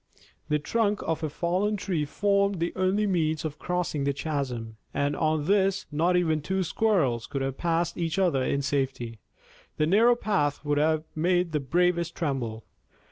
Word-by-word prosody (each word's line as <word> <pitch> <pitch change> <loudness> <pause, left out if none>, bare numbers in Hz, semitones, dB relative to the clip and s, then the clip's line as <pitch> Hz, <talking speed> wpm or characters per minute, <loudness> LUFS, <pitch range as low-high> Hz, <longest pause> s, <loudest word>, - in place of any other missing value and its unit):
The 150 - +3
trunk 210 +6 0
of 160 -1 -2
a 155 - -1
fallen 180 +7 0
tree 180 -6 -1
formed 200 +4 +1
the 170 +1 -1
only 190 +3 +1
means 160 -5 0
of 155 -1 -5
crossing 180 -5 -1
the 140 0 +1
chasm, 130 -7 -3 0.2
and 145 +1 0
on 155 -2 0
this 195 +1 +2
not 170 +4 +2
even 160 -3 +1
two 190 +5 -1
squirrels 155 - +1
could 135 -1 -3
have 135 0 -3
passed 170 0 0
each 165 +1 -1
other 175 -8 +2
in 140 +2 0
safety. 135 -5 -2 0.6
The 155 - +2
narrow 225 +8 +5
path 155 -11 -1
would 145 0 +1
have 155 +1 +2
made 175 +2 +1
the 150 - 0
bravest 170 +4 +1
tremble. 120 -8 -2
160 Hz, 170 wpm, -27 LUFS, 145-185 Hz, 0.6 s, narrow